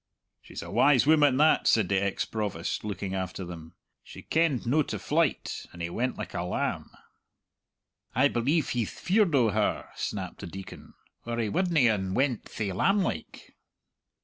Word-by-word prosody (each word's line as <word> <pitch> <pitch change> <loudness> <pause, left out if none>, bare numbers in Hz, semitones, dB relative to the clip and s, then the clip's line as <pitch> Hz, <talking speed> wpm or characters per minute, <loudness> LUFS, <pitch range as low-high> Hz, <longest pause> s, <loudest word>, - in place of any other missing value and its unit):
"She's - - -8
a - - -9
wise 140 -3 +4
woman 145 -3 +5
that," 155 +2 +4
said 110 -5 +4
the 95 0 +1
ex 100 -1 -1
Provost, 100 -6 -3
looking 100 -2 -4
after 95 0 -4
them. 80 -2 -10 0.3
"She - - -12
kenned 160 -7 +1
no 140 +7 +3
to - - -3
flyte, 155 -1 -1
and 85 - -13
he 85 0 -3
went 125 +7 -2
like - - -6
a - - -2
lamb." 90 +1 -2 1.3
"I 130 +4 +5
believe 140 +6 0
he'th 120 -4 -1
feared 190 -4 +1
o' 120 -4 +4
her," 105 0 -1
snapped - - -4
the - - -7
Deacon, 95 +3 -10 0.3
"or 120 0 -2
he 115 -3 0
wudny 170 - +2
un 95 -4 0
went 130 -3 0
thae 105 -3 -4
lamb 195 - +2
like!" - - -6
120 Hz, 170 wpm, -28 LUFS, 95-145 Hz, 1.3 s, woman